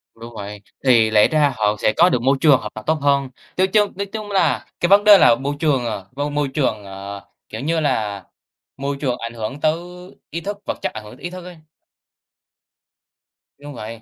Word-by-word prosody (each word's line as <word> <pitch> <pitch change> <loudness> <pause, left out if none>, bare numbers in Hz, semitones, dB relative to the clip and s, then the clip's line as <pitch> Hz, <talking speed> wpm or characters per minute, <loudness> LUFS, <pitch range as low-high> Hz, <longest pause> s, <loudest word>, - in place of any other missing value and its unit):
Đúng 115 +1 -11
vậy, 100 0 -7 0.2
thì 115 -4 +5
lẽ 105 -1 +5
ra 150 -3 +2
họ 105 -1 +1
sẽ 110 - +2
có 175 +2 +6
được 125 - 0
môi 135 +2 +2
trường 145 -5 +6
hợp 105 - -7
tập 110 - -8
tốt 160 - +4
hơn, 140 -1 +2 0.3
nói 185 +1 +3
chung 205 +1 +2
nói 200 - -3
chung 210 0 -7
là 165 -9 +1
cái 175 - +1
vấn 200 +1 +6
đề 210 -2 +9
là 115 - +6
môi 140 +3 -3
trường, 140 -6 +1
ờ, 105 -4 -4
môi 145 +1 -2
môi 145 -1 0
trường, 130 -6 -1
ờ, 100 +1 -8 0.3
kiểu - - -6
như 160 +4 0
là, 110 - -1 0.5
môi 140 +1 -3
trường 125 -4 -1
ảnh 115 0 -6
hưởng 115 +5 -5
tới 155 0 +2 0.5
ý 170 - -5
thức 200 +3 -5
vật - - -3
chất - - -2
ảnh 110 -1 -7
hưởng 105 +3 -12
tới - - -19
ý 175 - -3
thức 180 -1 -9
ấy. 180 - -10 2.0
Đúng 145 0 -10
vậy. 115 0 -8
135 Hz, 220 wpm, -20 LUFS, 110-160 Hz, 2.0 s, đề